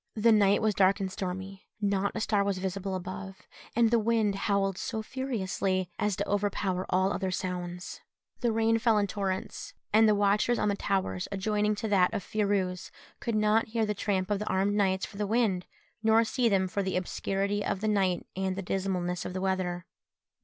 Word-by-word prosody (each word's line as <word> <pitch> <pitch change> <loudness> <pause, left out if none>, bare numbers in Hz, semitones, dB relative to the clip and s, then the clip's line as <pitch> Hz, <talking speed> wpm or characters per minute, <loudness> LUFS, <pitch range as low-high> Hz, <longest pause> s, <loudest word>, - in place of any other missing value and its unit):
The 230 +1 +4
night 205 0 +4
was 215 -1 +3
dark 195 +1 +3
and 190 -1 -2
stormy; 190 +1 -5
not 200 -1 0
a - - -2
star 210 -2 +2
was 200 -1 -1
visible 190 +1 -3
above, 185 +1 -6 0.4
and 230 -1 +4
the 235 - +4
wind 220 -2 +2
howled 195 -1 0
so 220 -2 -3
furiously 195 -8 -2
as 210 -3 +1
to 200 - -3
overpower 200 -2 -1
all 190 +2 +2
other 190 -1 -2
sounds: 180 -1 -4 0.4
the 240 -2 +1
rain 225 0 +2
fell 225 -1 +3
in 205 - +3
torrents, 195 -2 -4 0.2
and 220 0 +6
the 210 - +4
watchers 205 +4 +2
on 210 - +1
the 200 - +1
towers 190 - -1
adjoining 210 +2 0
to 220 - -3
that 185 -3 +4
of 195 - -2
Phirouz 200 -4 -1 0.3
could 230 -2 -2
not 215 +1 +3
hear 225 0 0
the 210 - -1
tramp 195 -1 -1
of 205 - +1
the 210 - -4
armed 195 +2 +1
knights 195 -2 +1
for 200 - -12
the 210 0 -1
wind, 210 -5 +1 0.3
nor 220 +1 +5
see 235 +1 +1
them 190 -2 +2
for 200 +2 -2
the 190 -1 -1
obscurity 195 +2 -1
of 195 - -1
the 215 - -2
night 195 -4 +1
and 190 0 -1
the 195 - -4
dismalness 180 -2 -2
of - - -5
the 185 - -3
weather. 185 -2 -1
200 Hz, 195 wpm, -29 LUFS, 190-215 Hz, 0.4 s, and